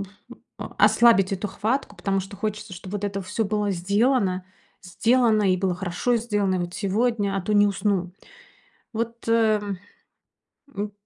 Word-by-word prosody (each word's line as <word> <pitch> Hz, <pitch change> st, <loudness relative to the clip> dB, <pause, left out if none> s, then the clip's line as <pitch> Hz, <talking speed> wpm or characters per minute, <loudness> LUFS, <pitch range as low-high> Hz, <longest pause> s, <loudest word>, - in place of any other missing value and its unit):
м, 200 Hz, -, -5 dB, 0.5 s
а, -, -, -7 dB
ослабить 225 Hz, -5 st, +5 dB
эту 195 Hz, +2 st, -2 dB
хватку, 220 Hz, +3 st, -2 dB
потому 195 Hz, +2 st, -1 dB
что 195 Hz, +1 st, -9 dB
хочется, 210 Hz, -2 st, -4 dB
чтоб 185 Hz, +2 st, -9 dB
вот 205 Hz, 0 st, -3 dB
это 200 Hz, -1 st, -2 dB
всё 210 Hz, +4 st, -2 dB
было 210 Hz, 0 st, -1 dB
сделано. 195 Hz, +1 st, +1 dB, 0.4 s
Сделано 225 Hz, +4 st, +2 dB
и -, -, +2 dB
было 185 Hz, -1 st, 0 dB
хорошо 190 Hz, +7 st, -1 dB
сделано, 205 Hz, -4 st, 0 dB
и -, -, -1 dB
вот 175 Hz, 0 st, -4 dB
сегодня, 205 Hz, 0 st, 0 dB
а -, -, 0 dB
то 210 Hz, -, -2 dB
не 205 Hz, 0 st, +5 dB
усну. 195 Hz, -3 st, -1 dB, 0.8 s
Вот, 230 Hz, +1 st, -4 dB
э, 220 Hz, -2 st, +3 dB
м. 200 Hz, -3 st, -5 dB, 1.0 s
М 205 Hz, +1 st, -3 dB
205 Hz, 165 wpm, -24 LUFS, 190-220 Hz, 1.0 s, ослабить